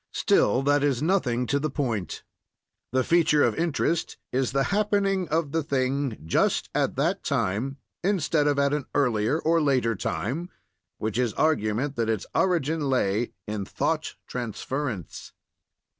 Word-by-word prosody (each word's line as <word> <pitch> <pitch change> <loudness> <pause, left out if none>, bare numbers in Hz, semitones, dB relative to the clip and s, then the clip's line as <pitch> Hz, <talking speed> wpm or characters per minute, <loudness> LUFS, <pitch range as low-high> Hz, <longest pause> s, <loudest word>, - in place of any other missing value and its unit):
Still, 125 +6 +3
that 145 0 +3
is 140 -2 +1
nothing 135 -9 +1
to 140 +3 +1
the 155 +2 -1
point; 120 - -3 0.7
the 130 +1 +2
feature 160 -2 +4
of - - +3
interest 165 0 -1
is 130 0 0
the 135 0 +2
happening 200 -3 +1
of 155 -2 0
the 165 - +1
thing 135 -3 -1
just 80 - +1
at - - 0
that - - 0
time, 120 +9 -1 0.3
instead 165 -6 +2
of 145 -1 +2
at 140 0 +2
an 150 -2 -1
earlier 120 -2 +2
or 165 0 +2
later 130 -6 +2
time, 140 - -3 0.5
which 110 +2 -2
is 120 -3 +1
argument 135 -2 0
that 115 -1 0
its 110 -3 -1
origin 160 -5 +1
lay 115 -3 +1
in 105 -2 -3
thought - - -2
transference. 120 - -5
140 Hz, 145 wpm, -26 LUFS, 120-155 Hz, 0.7 s, feature